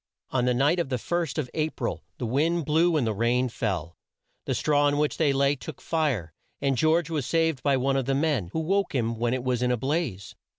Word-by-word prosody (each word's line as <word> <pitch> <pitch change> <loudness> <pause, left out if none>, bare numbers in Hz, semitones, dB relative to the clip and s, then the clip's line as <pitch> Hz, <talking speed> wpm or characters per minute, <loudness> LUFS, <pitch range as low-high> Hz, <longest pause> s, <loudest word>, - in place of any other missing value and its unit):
On 125 -2 +1
the 125 - +3
night 145 +8 +3
of 170 - -1
the 130 - 0
first 170 +3 -2
of 150 -5 -1
A 155 0 0
pril - - -4 0.2
the 125 - -3
wind 155 +7 +1
blew 160 +2 +3
and 135 - +1
the 110 - 0
rain 120 +4 +1
fell. 90 -8 -3 0.5
The - - -1
straw 145 -1 +2
on 145 0 +2
which 150 0 0
they 155 -3 +3
lay 140 +1 +2
took 155 +3 -9
fire, 135 - -1 0.3
and 140 -1 +1
George 160 +4 +2
was 150 -6 -1
saved 160 -5 +1
by 140 -2 +2
one 135 +1 +1
of 135 - 0
the 135 +1 +1
men, 140 - 0
who 160 - -1
woke 195 0 0
him 115 -2 -1
when 120 +1 +1
it 130 - -4
was 125 -1 0
in 125 - +2
a 125 - +1
blaze. 135 - -2
140 Hz, 240 wpm, -26 LUFS, 125-160 Hz, 0.5 s, the